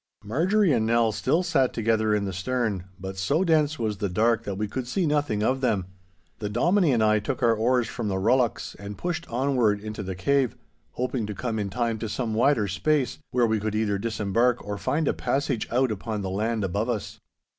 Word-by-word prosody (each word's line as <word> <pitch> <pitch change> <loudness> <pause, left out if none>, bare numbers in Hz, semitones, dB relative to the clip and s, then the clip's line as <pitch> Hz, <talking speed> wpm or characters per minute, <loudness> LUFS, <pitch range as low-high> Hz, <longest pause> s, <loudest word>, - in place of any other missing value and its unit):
Marjorie 170 - +2
and 110 -3 +1
Nell 115 -1 +3
still 145 - +1
sat 140 -8 +2
together 110 -1 +1
in 100 -1 0
the 95 - -3
stern, 105 -1 -1
but 95 +1 -6
so 140 - +1
dense 155 -3 +2
was 110 -4 -2
the 100 -2 -1
dark 115 +4 +1
that 100 - -3
we 105 +1 -1
could 125 +4 -4
see 175 +8 0
nothing 145 -9 0
of 130 +4 +1
them. 110 -8 +1 0.5
The 105 - -3
Dominie 170 - +3
and 115 -3 +2
I 110 0 +4
took 130 +5 -3
our 115 -1 +5
oars 120 +2 +1
from 110 - -4
the 95 -2 -1
rullocks 120 +4 +1
and 100 0 -7
pushed 170 -1 -3
onward 120 -4 +1
into 105 +1 -6
the 95 -2 -5
cave, 135 +6 +1 0.4
hoping 125 -3 -2
to 105 - -5
come 115 -1 -2
in 100 -1 -2
time 115 0 -1
to 110 - -4
some 115 0 -2
wider 115 -1 +3
space, 125 +7 0
where 125 -2 +2
we 110 -1 +1
could 110 +1 -2
either 105 -2 0
disembark 115 +3 0
or 100 0 -4
find 145 +6 0
a - - +2
passage 135 -1 -1
out 125 0 +2
upon 105 0 -4
the 95 - -3
land 110 +2 -1
above 100 +5 -1
us. 115 -4 -3
115 Hz, 210 wpm, -26 LUFS, 105-130 Hz, 0.5 s, our